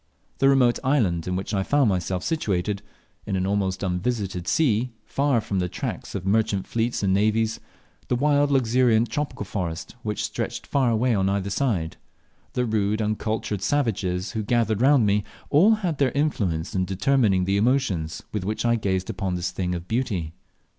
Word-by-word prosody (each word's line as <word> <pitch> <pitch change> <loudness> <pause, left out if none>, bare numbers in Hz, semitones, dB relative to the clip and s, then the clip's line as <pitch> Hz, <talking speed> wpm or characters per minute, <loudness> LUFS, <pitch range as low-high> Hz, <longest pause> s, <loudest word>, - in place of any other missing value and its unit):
The 135 - +5
remote 125 -3 +4
island 105 - +1
in 90 - -1
which 95 +3 -4
I 100 - +1
found 140 +5 +2
myself 90 -1 -1
situated, 100 - -1 0.5
in 95 - -1
an 95 0 0
almost 95 -1 -1
unvisited 95 -1 -2
sea, 125 -5 +2 0.2
far 140 -3 +1
from 100 -3 -2
the 90 0 -1
tracks - - -5
of 95 -2 -4
merchant 100 -1 +1
fleets 115 -1 -1
and 95 -1 +2
navies; 110 +2 +1 0.5
the - - +1
wild 145 +2 +3
luxuriant 120 -3 +3
tropical 145 -6 -3
forest, 90 -3 -4
which 105 -2 -3
stretched - - -4
far 135 -3 +1
away 115 +2 +2
on 95 -2 +1
every 100 0 -1
side; 95 - -1 0.6
the 125 - 0
rude 110 -1 0
uncultured 110 -1 -2
savages 100 -7 0
who 110 - -2
gathered 110 -1 +1
round 135 -3 +5
me, 105 0 +2 0.3
all 195 +10 +6
had 180 -9 -3
their 135 -3 +3
influence 100 - -1
in 95 -2 +1
determining 95 0 +2
the 100 +1 +1
emotions 100 -9 0
with 105 -3 -2
which 105 +4 -2
I 120 0 +3
gazed 95 -3 -1
upon 95 -5 -2
this 90 +1 -2
"thing 90 -1 -2
of 85 +1 -7
beauty." 100 -10 -2
105 Hz, 175 wpm, -24 LUFS, 95-125 Hz, 0.6 s, all